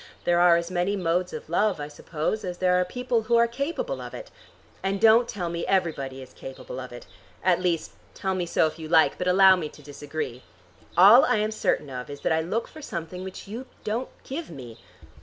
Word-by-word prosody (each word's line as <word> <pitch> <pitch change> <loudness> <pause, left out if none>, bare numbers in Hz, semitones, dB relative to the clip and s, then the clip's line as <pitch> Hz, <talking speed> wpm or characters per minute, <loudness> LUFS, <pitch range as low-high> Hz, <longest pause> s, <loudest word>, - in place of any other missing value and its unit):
There 175 0 +2
are 175 -1 +6
as 170 +1 -3
many 180 +3 0
modes 180 -1 0
of - - -7
love, 185 +2 +1
I 145 - -4
suppose, 155 +7 -3
as 180 -1 -4
there 180 0 +2
are - - +3
people 245 +4 -1
who 235 +2 +1
are 235 0 +6
capable 335 - -3
of - - -8
it. - - -9 0.5
And 195 +1 -1
don't 225 +2 +6
tell 180 -6 -4
me 170 0 -3
everybody 140 -8 -1
is 130 - -15
capable 130 -1 -8
of 125 -1 -8
it. 120 - -10 0.4
At 180 -1 +3
least, 175 -3 -1 0.2
tell 190 -1 -2
me 180 -2 -2
so 165 - +3
if 155 - -4
you 160 -1 -7
like, 160 -1 +4
but 180 - -2
allow 190 +1 +7
me 160 -4 -4
to 150 - -16
disagree. 145 -3 -6 0.6
All 210 +8 +9
I - - +2
am 215 +1 0
certain 150 -9 -1
of 125 -1 -6
is 145 0 -8
that - - 0
I 160 - +2
look 205 +8 -2
for 310 - -12
something 180 - -6
which 190 +1 -8
you 235 +6 -7 0.2
don't 230 +4 -2
give 310 +5 -6
me. 120 -7 -10
180 Hz, 220 wpm, -26 LUFS, 160-215 Hz, 0.6 s, All